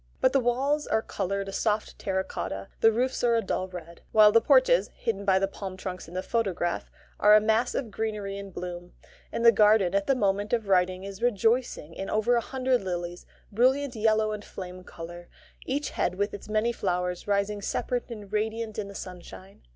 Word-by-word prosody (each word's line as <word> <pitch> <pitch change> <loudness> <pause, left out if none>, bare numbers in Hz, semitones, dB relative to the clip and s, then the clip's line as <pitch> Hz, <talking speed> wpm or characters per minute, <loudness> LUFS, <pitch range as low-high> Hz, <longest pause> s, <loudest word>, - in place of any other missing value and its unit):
But 260 - +3
the 275 - +5
walls 270 +5 0
are 220 - +1
coloured 195 +1 -3
a - - -5
soft 215 +1 -1
terra 190 -1 -1
cotta, 95 - -5
the 225 - +6
roofs 250 +4 -1
are 235 -1 +4
a 230 - +2
dull 185 -1 -2
red; 170 -2 -10
while 215 -1 +7
the 230 +1 +5
porches - - +4
(hidden 200 -3 -3
by 190 -1 +4
the 195 +1 +1
palm 195 -1 -7
trunks 185 -1 -6
in 170 - -11
the 185 - -2
photograph) 190 -7 -1 0.3
are 210 +1 +7
a - - +8
mass 220 +3 +1
of 235 -6 -3
greenery 210 -2 -3
and 200 -1 -8
bloom; 175 0 -7 0.4
and 230 - -2
the 230 - +10
garden 210 -3 +4
at 200 0 +1
the 270 - +3
moment 205 -2 0
of 225 -3 0
writing 185 -1 +2
is 195 +1 -8
rejoicing 230 -6 +1
in 195 - -5
over 215 +3 +2
a 235 - +2
hundred 260 -1 0
lilies, 175 -1 -4 0.2
brilliant 260 +4 +2
yellow 215 0 +2
and 210 -1 -5
flame 185 -2 -8
colour, 175 0 -10 0.4
each 280 +2 -1
head 180 - -1
with 205 +2 -1
its 205 - -9
many 215 +2 +1
flowers 180 -4 -2
rising 205 0 0
separate 245 +5 -2
and 210 -3 -9
radiant 220 +1 -2
in 205 - -3
the 200 - -10
sunshine. 185 +1 -10
205 Hz, 200 wpm, -27 LUFS, 185-230 Hz, 0.4 s, the